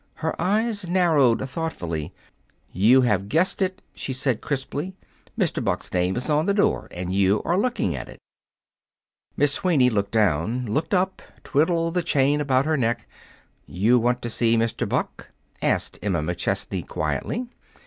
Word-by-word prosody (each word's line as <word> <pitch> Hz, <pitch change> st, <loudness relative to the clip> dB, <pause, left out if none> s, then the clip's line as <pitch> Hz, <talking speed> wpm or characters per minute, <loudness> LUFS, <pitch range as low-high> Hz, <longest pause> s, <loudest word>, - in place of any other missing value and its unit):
Her 160 Hz, 0 st, -2 dB
eyes 205 Hz, 0 st, 0 dB
narrowed 155 Hz, -9 st, +3 dB
thoughtfully. 90 Hz, -, -4 dB, 0.6 s
"You 115 Hz, +8 st, +5 dB
have 105 Hz, -5 st, +1 dB
guessed 170 Hz, -, +1 dB
it," 190 Hz, +1 st, -1 dB
she 135 Hz, -, -4 dB
said 130 Hz, -3 st, -1 dB
crisply. 145 Hz, +6 st, -3 dB, 0.4 s
"Mr. -, -, 0 dB
Buck's -, -, -2 dB
name 90 Hz, +1 st, +1 dB
is 125 Hz, -, -3 dB
on 155 Hz, +1 st, +1 dB
the 200 Hz, -, +2 dB
door, 205 Hz, -, +1 dB
and 90 Hz, +1 st, -5 dB
you 100 Hz, +1 st, +3 dB
are 170 Hz, -, +1 dB
looking 195 Hz, -, 0 dB
at 65 Hz, -, -7 dB
it." -, -, -11 dB, 1.2 s
Miss 145 Hz, 0 st, +3 dB
Sweeney 145 Hz, -10 st, +3 dB
looked 100 Hz, -2 st, 0 dB
down, 110 Hz, +3 st, +1 dB
looked 150 Hz, -, -1 dB
up, 185 Hz, +1 st, 0 dB, 0.2 s
twiddled 165 Hz, +3 st, +1 dB
the 180 Hz, -, +1 dB
chain 145 Hz, -3 st, +2 dB
about 135 Hz, -2 st, +2 dB
her 155 Hz, 0 st, +1 dB
neck. 115 Hz, -3 st, -1 dB, 0.6 s
"You 110 Hz, +8 st, +3 dB
want 120 Hz, +1 st, 0 dB
to 120 Hz, -, -2 dB
see 115 Hz, 0 st, +2 dB
Mr. 115 Hz, 0 st, -1 dB
Buck?" -, -, -3 dB, 0.3 s
asked -, -, 0 dB
Emma 90 Hz, -4 st, 0 dB
McChesney 90 Hz, +2 st, -2 dB
quietly. 250 Hz, +2 st, -2 dB
130 Hz, 155 wpm, -24 LUFS, 105-165 Hz, 1.2 s, You